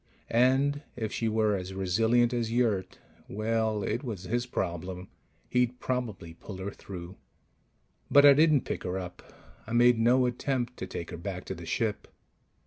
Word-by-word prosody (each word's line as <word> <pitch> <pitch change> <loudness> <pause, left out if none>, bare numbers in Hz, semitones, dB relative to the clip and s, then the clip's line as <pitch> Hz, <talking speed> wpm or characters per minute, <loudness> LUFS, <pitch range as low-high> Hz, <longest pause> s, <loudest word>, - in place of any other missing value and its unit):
And 135 +4 +3
if 110 -3 -4
she 115 - -1
were 110 -1 +2
as 95 0 -5
resilient 115 +6 +2
as 115 -2 -1
Yurt... 115 -6 0 0.3
well, 110 0 0
it 120 - -2
was 110 -8 -5
his 120 +6 -1
problem. 90 -3 -4 0.4
He'd 125 0 +1
probably 110 -10 -3
pull 95 +3 -9
her 95 +2 -4
through. 90 -1 -9 0.9
But 145 0 +7
I 140 - +10
didn't 150 -1 +4
pick - - -3
her 90 +1 -3
up. 90 -1 -7 0.5
I 110 - -5
made 120 0 +5
no 125 +3 +4
attempt 125 0 -2
to 95 - -5
take 85 - -6
her - - -6
back 90 +1 -5
to - - -4
the 85 -2 -9
ship. 110 -3 -1
110 Hz, 165 wpm, -29 LUFS, 95-125 Hz, 0.9 s, I